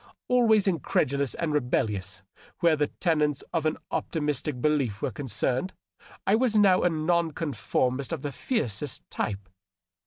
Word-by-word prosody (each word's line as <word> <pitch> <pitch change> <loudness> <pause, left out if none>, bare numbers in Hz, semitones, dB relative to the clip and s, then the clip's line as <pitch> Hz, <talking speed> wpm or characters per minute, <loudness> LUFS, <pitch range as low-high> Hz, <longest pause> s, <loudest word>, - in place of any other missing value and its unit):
Always 220 -5 +4
incredulous 140 - 0
and 160 -3 -2
rebellious 105 -8 -1 0.4
where 170 -3 +4
the 150 -1 +1
tenets 150 -5 0
of 160 -2 +1
an 155 - -1
op - - -2
timistic 150 -3 -1
belief 135 -8 0
were - - 0
concerned, 130 - -1 0.5
I 195 - +3
was 230 0 +2
now 195 -3 +5
a 180 - +3
non 165 0 +1
conformist 135 -3 -1
of 160 -4 -3
the 145 - -2
fiercest 135 - -3
type. 100 -2 -3
150 Hz, 145 wpm, -27 LUFS, 130-170 Hz, 0.5 s, now